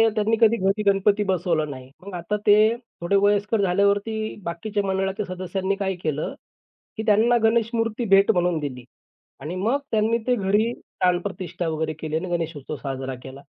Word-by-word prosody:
त्यांनी 215 +1 +2
कधी 230 0 +5
घरी 195 +2 0
गणपती 200 +1 +2
बसवलं 175 -5 0
नाही. 130 -1 -10 0.2
मग 200 - -8
आता 175 +5 -2
ते 215 +2 +6 0.3
थोडे 170 +4 +1
वयस्कर 205 +1 +2
झाल्यावरती 200 +3 +1
बाकीच्या 200 +5 -3
मंडळाच्या 195 +2 -1
सदस्यांनी 185 +1 -2
काय 195 -1 -2
केलं, 155 -1 -2 0.6
की 220 - -2
त्यांना 225 +3 +4
गणेशमूर्ती 225 0 +1
भेट 195 0 +6
म्हणून 175 -2 +1
दिली 130 -4 -5 0.6
आणि 155 +6 -5
मग 225 +9 +1
त्यांनी 220 +1 +2
ते 250 - +3
घरी 210 +2 +1 0.3
प्राणप्रतिष्ठा 180 -1 -1
वगैरे 155 0 -2
केली 155 -1 -4
आणि 185 +2 -4
गणेशोत्सव 165 -4 -3
साजरा 135 -2 -5
केला. 135 +1 -10
195 Hz, 155 wpm, -24 LUFS, 170-215 Hz, 0.6 s, ते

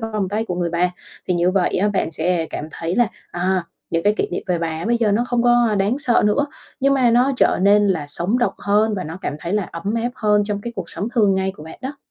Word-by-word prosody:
vòng 215 -4 -2
tay 215 +3 -1
của 180 - -3
người 175 -1 -1
bà. 175 +1 +1 0.4
Thì 180 - +2
như 175 +1 +2
vậy 185 -1 +1
á, 205 - +2
bạn 195 -5 -1
sẽ 165 +1 0
cảm 155 - -5
thấy 165 +5 -4
là, 240 -2 +4 0.2
à, 180 +1 0 0.3
những 165 0 0
cái 205 +3 +3
kỷ - - 0
niệm - - -3
về 180 -2 0
bà 165 +1 -3
bây 235 +1 +2
giờ 220 -3 +2
nó 235 +4 +2
không 245 -1 0
có, 240 0 +4
a, 210 - 0
đáng 205 +7 +1
sợ 245 -4 +2
nữa, 285 +8 +2 0.3
nhưng 275 +1 +3
mà 250 -3 +3
nó 250 +4 +3
trở - - +3
nên 205 +1 +5
là 160 -6 0
sống 180 +10 -1
động 240 - +1
hơn 210 +1 +2
và 185 - -3
nó 160 +4 -7
cảm 145 - -3
thấy 170 - -4
là 210 -1 +1
ấm 200 +6 -3
áp 235 +1 -1
hơn 210 -2 +2
trong 205 -1 -2
cái 235 +2 -6
cuộc 185 -4 -5
sống 200 +7 -4
thường 205 -5 +4
ngày 190 0 -1
của 150 - -11
bạn 160 - -10
đó. 280 +3 -5
205 Hz, 280 wpm, -20 LUFS, 175-230 Hz, 0.4 s, nên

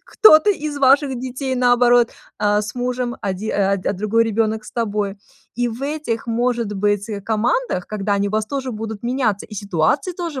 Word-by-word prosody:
кто-то 415 -2 +6
из 300 -6 -3
ваших 275 0 +4
детей, 260 +1 -3
наоборот, 245 -1 +4 0.3
а 210 0 +2
с 210 +2 -6
мужем, 245 0 -2
оди 195 +2 -3
а, 200 0 +1
д 190 - -2
другой 215 +4 +1
ребёнок 220 0 -1
с - - -11
тобой. 210 -3 -2 0.4
И 245 0 0
в 230 +2 -7
этих, 285 -6 -3
может 235 -2 0
быть, 205 +1 0
э, 205 -2 -4
командах, 220 - -1
когда 205 -1 -1
они 200 0 0
у - - -6
вас 215 0 0
тоже 265 -2 -4
будут 220 -1 -6
меняться, 240 -5 0
и 215 - -11
ситуации 200 - 0
тоже 335 -6 -5
230 Hz, 185 wpm, -20 LUFS, 210-260 Hz, 0.4 s, кто-то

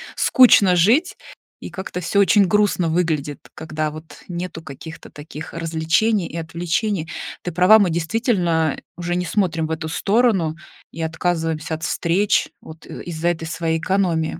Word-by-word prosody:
скучно 205 -7 +5
жить, 255 - +3 0.4
и - - -9
как-то 190 -1 -6
всё 180 +4 0
очень 200 +1 +5
грустно 205 -4 +2
выглядит, 160 -4 -1 0.2
когда 155 -1 -3
вот 155 +1 -12
нету 175 -2 -6
каких-то 160 +2 -10
таких 150 +1 -10
развлечений 165 +5 0
и 170 - -8
отвлечений. 170 +2 -2 0.3
Ты 180 - -4
права, 180 +6 +6
мы 195 -4 +3
действительно 170 - 0 0.2
уже 175 0 -3
не 180 0 -1
смотрим 170 -3 0
в 160 - -5
эту 160 0 -3
сторону 195 -3 +1 0.4
и 165 - -7
отказываемся 160 -1 -2
от 160 0 -5
встреч 180 +7 +1
вот 160 0 -13
из-за 170 0 -4
этой 165 -2 -3
своей 165 0 -1
экономии. 170 -3 0
170 Hz, 145 wpm, -21 LUFS, 160-190 Hz, 0.4 s, права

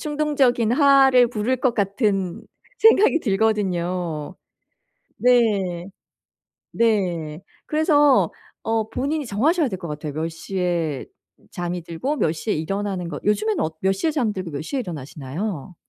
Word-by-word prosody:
충동적인 285 -6 +1
화를 270 -3 +5
부를 235 +3 -1
것 250 -2 0
같은 200 -3 -1 0.4
생각이 430 -6 +5
들거든요. 185 - -1 0.8
네. 205 -8 +2 0.9
네. 180 -8 0 0.3
그래서 295 -3 +3 0.3
어 225 -1 -1
본인이 285 +4 -2
정하셔야 290 - +1
될 190 -4 -5
것 175 - -7
같아요. 150 -1 -5
몇 160 +1 -2
시에 170 -4 -2 0.5
잠이 175 0 -4
들고 170 - -3
몇 160 - +1
시에 190 +6 -2
일어나는 190 +2 -3
것. 145 - -6
요즘에는 210 +1 +1
어 160 - -1
몇 190 0 +3
시에 195 +12 -1
잠들고 215 - -2
몇 140 - -4
시에 270 - -3
일어나시나요? 160 - -6
205 Hz, 270 characters per minute, -22 LUFS, 170-250 Hz, 0.9 s, 화를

